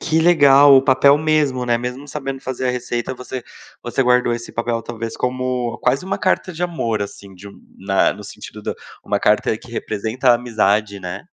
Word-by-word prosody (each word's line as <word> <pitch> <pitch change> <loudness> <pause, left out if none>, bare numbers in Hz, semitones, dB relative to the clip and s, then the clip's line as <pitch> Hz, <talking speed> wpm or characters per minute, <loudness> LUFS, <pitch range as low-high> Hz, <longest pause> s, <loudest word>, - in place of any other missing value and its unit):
Que 160 0 +1
legal, 145 -4 +6
o 130 - +5
papel 135 +1 +5
mesmo, 150 -4 +1
né? 120 -1 +1
Mesmo 125 +4 -6
sabendo 135 -2 -5
fazer 130 0 -3
a - - +3
receita, 125 0 -3
você 125 0 -7 0.4
você 120 +2 -1
guardou 125 -1 +2
esse 120 0 -8
papel, 115 0 -2
talvez 115 0 -6
como 125 -1 -2
quase 130 +7 +1
uma 195 +1 -3
carta 185 0 0
de 170 +1 -6
amor, 120 -11 -2
assim, 100 -1 -9
de 95 +2 -12 0.3
na 95 0 +2
no - - -11
sentido - - -10
da - - -3 0.3
uma - - 0
carta - - +2
que - - -15
representa 115 +5 -1
a - - +7
amizade, 105 -4 0
né? 90 -1 -6
125 Hz, 190 wpm, -19 LUFS, 115-140 Hz, 0.4 s, a